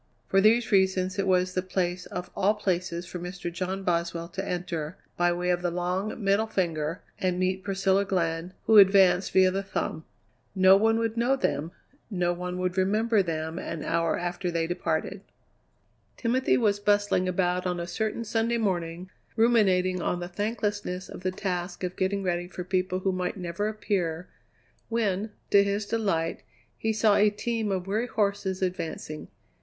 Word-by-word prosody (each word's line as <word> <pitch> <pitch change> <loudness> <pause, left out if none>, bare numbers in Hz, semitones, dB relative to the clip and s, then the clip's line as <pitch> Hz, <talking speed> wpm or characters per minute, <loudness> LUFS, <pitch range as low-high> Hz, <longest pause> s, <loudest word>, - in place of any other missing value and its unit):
For 195 - +3
these 230 +3 +4
reasons 190 -1 +2
it 195 - 0
was 185 0 +2
the 185 - 0
place 180 -1 -2
of 180 - -6
all 200 +2 +2
places 180 -3 -2
for 180 0 -7
Mr. 180 0 -6
John 190 +2 -3
Boswell 170 -1 -1
to 190 +2 -4
enter, 175 -4 -4 0.2
by 175 0 +2
way 180 +1 0
of 175 0 0
the 175 - 0
long, 180 +5 -2
middle 200 +3 +2
finger, 165 -5 -2 0.2
and 185 -1 0
meet 185 +1 0
Priscilla 195 0 +2
Glenn, 170 -2 -1
who 220 -1 +7
advanced 190 -2 +5
via 185 0 +5
the 195 +1 -1
thumb. 160 -4 -3 0.5
No 190 0 +7
one 225 +3 +3
would 230 0 -1
know 245 +3 +3
them; 155 - -1 0.4
no 175 -4 0
one 180 +1 -4
would 180 0 -1
remember 215 +3 +2
them 160 -1 -3
an 165 -4 -5
hour 165 0 0
after 175 +1 -3
they 165 -1 0
departed. 175 +3 -2 1.0
Timothy 255 +2 +2
was 205 -4 +2
bustling 205 -2 +2
about 180 0 0
on 180 -1 -2
a 170 - -3
certain 220 +5 -2
Sunday 230 +1 0
morning, 180 -4 -2 0.2
ruminating 190 -6 +3
on 175 - -1
the 175 - -4
thanklessness 205 -1 -3
of - - -9
the 185 - 0
task 180 -1 -4
of 180 0 -3
getting 195 +1 0
ready 175 -1 -1
for 180 0 -6
people 185 0 -1
who 190 - +1
might 185 +1 -2
never 180 +3 -2
appear, 185 -6 -2 0.6
when, 215 -3 0 0.2
to 200 0 +7
his 200 +1 -1
delight, 195 -7 -1 0.3
he 220 - -1
saw 215 -1 +3
a 210 +1 +5
team 220 0 -2
of 185 -2 -1
weary 215 +5 -1
horses 200 -4 -1
advancing. 165 -4 -4
185 Hz, 170 wpm, -27 LUFS, 175-205 Hz, 1.0 s, who